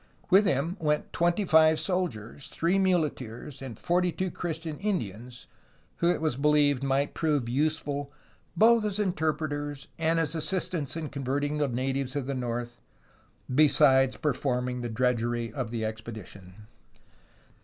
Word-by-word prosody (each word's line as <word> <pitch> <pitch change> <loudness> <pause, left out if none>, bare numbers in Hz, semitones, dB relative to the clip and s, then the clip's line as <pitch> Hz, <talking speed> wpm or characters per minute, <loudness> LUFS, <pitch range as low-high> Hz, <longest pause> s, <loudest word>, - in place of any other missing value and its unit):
With 195 +2 +6
him 165 +4 0
went 150 -1 -1
twenty 175 +4 +1
five 160 -1 +5
soldiers, 145 - -3
three 175 +4 0
muleteers, 150 - -1
and 125 -5 -7
forty 180 0 +1
two 185 +1 -3
Christian 160 -2 -5
Indians, 125 - -4 0.5
who 170 - +2
it 175 - +1
was 155 -5 -1
believed 145 -2 +3
might 140 +1 0
prove 150 -6 0
useful 145 +1 -1 0.5
both 230 +1 +6
as 210 -2 -1
interpreters 155 -6 -2
and 165 +1 +2
as 160 -1 0
assistants 165 -2 -1
in 155 -3 -4
con 140 -2 -6
verting 145 +3 -1
the 145 - +2
natives 130 +2 -2
of 140 -3 -2
the 140 - -2
north, 120 -1 -4 0.7
besides 135 -2 +5
performing 125 -3 -1
the 120 - -3
drudgery 120 -1 0
of 125 -4 -3
the 115 -1 -3
expedition. 110 -3 -8
145 Hz, 140 wpm, -28 LUFS, 125-165 Hz, 0.7 s, With